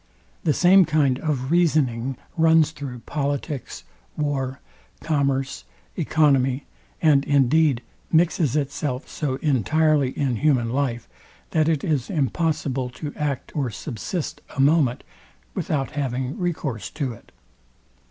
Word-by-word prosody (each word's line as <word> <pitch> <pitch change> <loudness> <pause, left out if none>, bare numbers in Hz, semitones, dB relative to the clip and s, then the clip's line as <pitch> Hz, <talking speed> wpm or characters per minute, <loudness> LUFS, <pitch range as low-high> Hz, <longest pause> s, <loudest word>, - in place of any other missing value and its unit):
The 155 - +4
same 185 +4 +6
kind 145 -5 +2
of 145 -4 -2
reasoning 135 -7 +2 0.2
runs 160 -1 +4
through 135 -6 -7
politics, 145 -1 -3 0.3
war, 140 -3 -2 0.4
commerce, 135 - -1 0.3
economy, 135 -3 +2 0.4
and 145 -3 +5
indeed 140 -1 +3 0.3
mixes 160 -4 +2
itself 140 -2 -2
so 140 -4 -2
entirely 150 +1 +2
in 130 -5 0
human 125 -4 +2
life, 130 -4 -1 0.4
that 155 0 +2
it 155 -4 0
is 145 -7 0
impossible 140 - -1
to 145 +4 -7
act 145 -3 -3
or 140 -5 0
subsist 125 - -5
a - - -6
moment 140 -3 +3 0.5
without 135 -3 -2
having 130 -2 -2
recourse 140 - -3
to 135 -2 -3
it. - - -17
140 Hz, 115 wpm, -23 LUFS, 130-155 Hz, 0.5 s, same